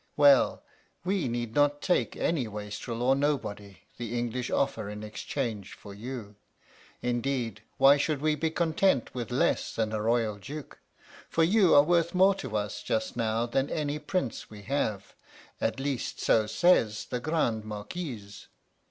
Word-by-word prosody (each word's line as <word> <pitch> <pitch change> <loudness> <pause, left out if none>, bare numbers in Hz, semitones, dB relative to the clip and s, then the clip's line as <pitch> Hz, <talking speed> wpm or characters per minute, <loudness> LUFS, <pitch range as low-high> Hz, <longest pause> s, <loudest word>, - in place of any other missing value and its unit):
Well, 145 -2 +5 0.4
we 190 -5 0
need 120 -1 -3
not 145 +1 +3
take 180 - +1
any 150 -8 0
wastrel 105 +3 -5
or 130 +2 +4
nobody 105 -9 -2 0.2
the 120 0 -4
English 120 +1 -2
offer 110 -6 0
in 105 0 -7
exchange 105 -1 -4
for 100 - -11
you. 110 -1 -7 0.7
Indeed, 120 -3 -1 0.2
why 135 +2 +7
should 145 0 0
we 155 +1 +2
be 160 +2 0
content 160 - +1
with 120 -2 -4
less 125 +2 0
than 110 -1 0
a 110 - -1
royal 115 -1 +1
duke? 140 +9 -9 0.5
For 165 - +2
you 190 +1 +5
are 145 - +8
worth 170 +2 +2
more 190 +2 +6
to 130 - -4
us 105 0 -3
just 110 +1 -2
now 115 0 0
than 135 +4 0
any 150 -1 -2
prince 150 -4 -3
we 105 -1 -11
have; 105 -6 -2 0.5
at - - 0
least 135 -3 -3
so 110 -2 +3
says 115 -7 +3
the 125 - -3
Grande 120 -7 0
Marquise. 105 - -7
120 Hz, 155 wpm, -29 LUFS, 110-145 Hz, 0.7 s, are